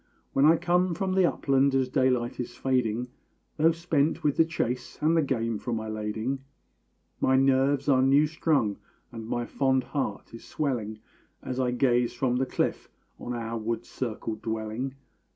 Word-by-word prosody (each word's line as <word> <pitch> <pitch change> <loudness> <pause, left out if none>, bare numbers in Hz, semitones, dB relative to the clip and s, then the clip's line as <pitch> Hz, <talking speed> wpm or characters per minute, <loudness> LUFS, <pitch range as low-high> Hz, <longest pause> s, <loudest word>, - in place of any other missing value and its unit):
When 135 - +4
I 160 +2 +6
come 180 +1 +1
from 190 +2 -1
the 190 -2 +4
upland 135 0 +2
as 130 -1 +2
daylight 125 -2 +1
is 120 -1 -5
fading, 125 -2 0 0.5
Though 160 +2 +5
spent 165 -1 0
with 145 -2 +2
the 165 - +4
chase, 125 -7 -3
and 160 +2 +2
the 165 - +4
game 115 -6 -1
for 120 - -4
my 110 -1 -3
lading, 110 +5 -3 0.8
My 130 - +3
nerves 135 +1 +2
are 130 -2 +4
new 140 +3 +5
strung 150 - 0 0.3
and 115 -1 -8
my 120 +1 -2
fond 130 0 +1
heart 125 -8 -4
is 115 - -10
swelling 120 -8 -3 0.5
As 130 0 -4
I 125 -1 +1
gaze 125 -1 +1
from 125 0 0
the 130 +1 0
cliff - - -2 0.3
on 125 - -5
our 115 0 -4
wood 115 +1 -3
circled 110 -3 -5
dwelling. 110 +4 -3
130 Hz, 170 wpm, -27 LUFS, 115-140 Hz, 0.8 s, I